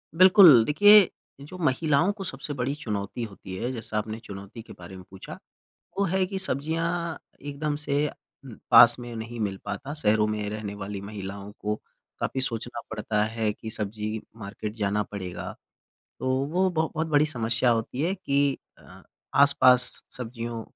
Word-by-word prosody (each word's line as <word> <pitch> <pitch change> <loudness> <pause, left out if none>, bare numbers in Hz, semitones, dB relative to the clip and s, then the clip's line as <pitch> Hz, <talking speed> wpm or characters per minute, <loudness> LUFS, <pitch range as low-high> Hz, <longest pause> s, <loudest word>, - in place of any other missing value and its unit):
बिल्कुल, 180 - +8
देखिए 205 - +7 0.3
जो 150 +6 -10
महिलाओं 155 +3 +2
को 200 -2 -7
सबसे 145 -4 -5
बड़ी 130 0 -2
चुनौती 105 -1 -4
होती 100 -3 -8
है 120 +6 -3
जैसा 110 -2 -5
आपने 110 +1 -3
चुनौती 100 +3 -9
के - - -13
बारे 90 +2 -12
में 95 - -10
पूछा 95 0 -10 0.7
वो 200 - +3
है 190 +2 +1
कि 195 +1 -4
सब्ज़ियाँ 165 +1 -1 0.2
एकदम 145 +1 -3
से 145 0 0 0.6
पास 120 0 +8
में 120 -1 -8
नहीं 115 +1 -6
मिल 100 -2 -1
पाता। 135 +8 -5
शहरों 110 -7 +2
में 105 -1 -2
रहने 105 -1 -5
वाली 100 0 -6
महिलाओं 100 0 -7
को 105 0 -1 0.5
काफ़ी 130 - -2
सोचना 120 -1 -3
पड़ता 105 -1 -1
है 110 -1 -1
कि 110 +1 -8
सब्ज़ी 110 0 -4 0.2
मार्केट 105 0 -6
जाना 105 -1 0
पड़ेगा 95 -3 -6 0.7
तो 130 - -2 0.2
वो 185 +5 +1
ब 180 - -11
बहुत 160 0 -1
बड़ी 150 -1 +3
समस्या 120 -3 0
होती 115 +3 -1
है 175 +4 +1
कि 140 -6 0 0.2
अ, - - -16 0.3
आस-पास 130 -3 +4
सब्जियों 115 -2 -5
120 Hz, 160 wpm, -26 LUFS, 105-150 Hz, 0.7 s, बिल्कुल